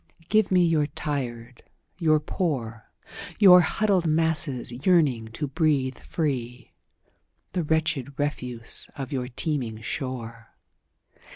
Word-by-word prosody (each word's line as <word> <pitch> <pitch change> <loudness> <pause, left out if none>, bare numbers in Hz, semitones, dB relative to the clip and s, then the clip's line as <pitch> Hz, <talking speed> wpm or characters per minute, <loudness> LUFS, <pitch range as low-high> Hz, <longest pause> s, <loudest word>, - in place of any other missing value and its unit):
"Give 215 -2 +3
me 180 -1 +5
your 155 -3 +2
tired, 125 -5 -5 0.4
your 155 -3 +3
poor, 130 - -3 0.5
Your 180 -3 +8
huddled 190 -1 +1
masses 155 -5 +1
yearning 150 -11 +3
to 150 - -3
breathe 140 -3 0
free, 125 - -4 0.8
The 180 - -1
wretched 150 -4 -1
refuse 125 -5 -2
of 135 -3 -6
your 130 -3 -2
teeming 125 -4 -1
shore. 115 -3 -6
145 Hz, 105 wpm, -25 LUFS, 125-160 Hz, 0.8 s, Your